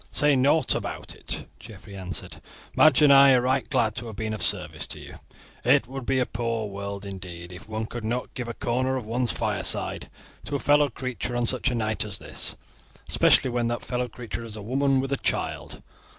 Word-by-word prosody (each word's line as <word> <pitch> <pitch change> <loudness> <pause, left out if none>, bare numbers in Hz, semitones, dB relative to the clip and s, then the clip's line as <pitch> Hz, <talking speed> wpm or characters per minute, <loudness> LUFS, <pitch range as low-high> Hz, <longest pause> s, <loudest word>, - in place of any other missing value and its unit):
"Say 145 -1 +3
nought 140 +5 +3
about - - -5
it," - - -6
Geoffrey 100 - -12
answered; 90 -2 -5 0.3
"Madge 155 -1 +6
and 145 -1 +8
I 135 0 +8
are 125 - +4
right 130 +1 0
glad 110 -2 +2
to 120 0 -3
have 110 - -7
been 110 0 -3
of 105 - -5
service - - +1
to - - -2
you. - - -11 0.4
It - - +4
would 135 -1 -7
be 135 - +2
a 125 - +2
poor 115 -2 -2
world 100 0 -6
indeed 90 -3 -8
if 90 +4 -11
one 110 0 -2
could 120 +1 -6
not 120 +3 -3
give 125 -2 -5
a 120 - -5
corner 130 +2 0
of 125 - -5
one's 120 +1 0
fireside - - -1 0.4
to 145 - -3
a - - 0
fellow 145 0 +4
creature 125 0 -4
on 120 0 +1
such 130 +2 +2
a 125 - -1
night 110 -2 0
as - - 0
this, - - -4 0.5
especially 130 - +4
when 120 -1 0
that 120 0 -3
fellow 125 0 -1
creature 120 -1 -7
is 110 -2 -8
a 105 - -7
woman 135 +3 +2
with 135 +1 -4
a 140 - +1
child. - - -3
120 Hz, 210 wpm, -26 LUFS, 110-130 Hz, 0.5 s, and